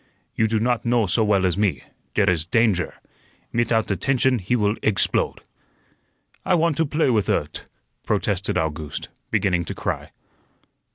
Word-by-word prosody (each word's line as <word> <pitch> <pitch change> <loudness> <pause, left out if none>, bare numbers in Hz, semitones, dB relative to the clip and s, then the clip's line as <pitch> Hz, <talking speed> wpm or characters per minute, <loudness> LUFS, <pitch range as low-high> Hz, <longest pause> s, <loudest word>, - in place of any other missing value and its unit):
"You 110 - +2
do 110 0 0
not 120 +1 0
know 120 -2 +2
so 105 +5 +2
well 100 -3 +2
as 90 +1 0
me; 105 -3 0 0.3
dere - - +3
is 85 -3 +2
dandger. 105 -4 +2 0.6
Mitout 115 -2 +1
attention 130 +4 +1
he 95 +6 0
will 105 -3 +2
eggsplode." 110 -3 0 1.0
"I 185 - +2
want 165 -2 +2
to 160 - +1
play 150 -2 +1
with 105 -5 +1
ut," - - -2 0.4
protested - - -1
August, 80 -1 -3 0.2
beginning 90 -3 +1
to - - -5
cry. - - -3
110 Hz, 150 wpm, -23 LUFS, 95-120 Hz, 1.0 s, dere